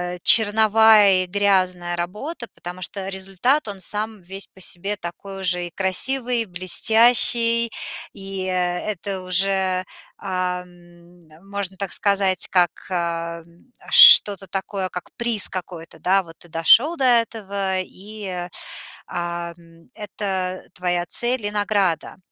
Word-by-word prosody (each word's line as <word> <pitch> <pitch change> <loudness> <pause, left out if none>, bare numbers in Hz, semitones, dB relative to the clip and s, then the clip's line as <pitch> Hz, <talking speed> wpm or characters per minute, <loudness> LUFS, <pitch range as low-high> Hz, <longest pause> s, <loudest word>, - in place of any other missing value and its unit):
э, - - -10
черновая 215 -3 +5
и - - -6
грязная 185 -3 0
работа. 210 - -6
Потому 180 +1 -9
что 190 +1 -5
результат- 195 +8 -1
он 200 -2 -5
сам 215 +3 -3
весь 190 +3 -6
по - - -21
себе 195 +4 -2
такой 195 +2 -8
уже 180 -1 0
и - - -13
красивый, 235 +7 -1
блестящий, 230 +5 +3 0.4
и 195 -1 -6
это 185 +1 -3
уже, 185 0 0 0.3
ам, 180 -2 -6 0.3
можно 200 -1 -5
так 200 -1 -4
сказать, 195 -3 +2
как, 175 -3 +3 0.2
э, 170 -2 -3 0.5
что-то 480 - +8
такое, 190 0 -4
как 180 -1 -8
приз 235 -4 +4
какой-то, 170 -3 -8
да. 190 +3 +1
Вот 165 -1 -15
ты 175 - -15
дошел 235 - +4
до 265 - 0
этого, 200 -5 0
и, 190 -2 -8 0.6
ам, 170 -1 -5 0.4
это 190 -3 -5
твоя 175 -1 -2
цель 240 -2 0
и 205 - -2
награда. 200 -6 -1
190 Hz, 120 wpm, -21 LUFS, 180-210 Hz, 0.6 s, что-то